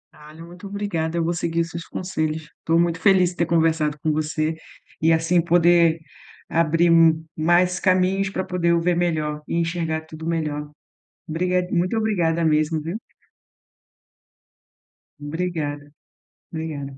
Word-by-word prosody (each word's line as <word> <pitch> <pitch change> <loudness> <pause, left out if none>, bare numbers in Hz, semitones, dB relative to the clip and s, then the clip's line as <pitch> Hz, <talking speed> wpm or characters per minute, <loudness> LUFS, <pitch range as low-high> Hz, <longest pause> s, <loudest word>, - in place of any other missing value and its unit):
Ah, 150 0 -14
o 165 - -9
muito 180 +3 -11
obrigada, 175 -5 -3
eu 170 - +1
vou 170 +1 0
seguir 170 0 -1
os 165 - -3
seus 170 0 -7
conselhos. 160 -4 -3 0.2
Estou 165 +1 +1
muito 170 -1 +1
feliz 185 -1 +4
de - - -14
ter 170 - +2
conversado 160 -2 +1
com 155 - 0
você 155 +1 -1 0.5
e, 160 +1 +4
assim, 165 +2 +3
poder 170 -1 +4 0.5
abrir 165 +1 +2 0.4
mais 175 +3 +2
caminhos 185 +1 +2
para 190 -1 -3
poder 175 -2 0
o 170 - +3
ver 175 +1 +1
melhor 155 -3 -1
e - - -3
enxergar 165 -1 -1
tudo 160 +1 -8
melhor. 150 -3 -2 0.6
Obriga 180 +2 0
muito 180 +5 0
obrigada 170 -7 +1
mesmo, 155 0 +2
viu? 170 +8 -5 2.2
Obrigada. 145 -2 -4 0.6
Obrigada. 145 -4 -5
165 Hz, 140 wpm, -22 LUFS, 160-175 Hz, 2.2 s, feliz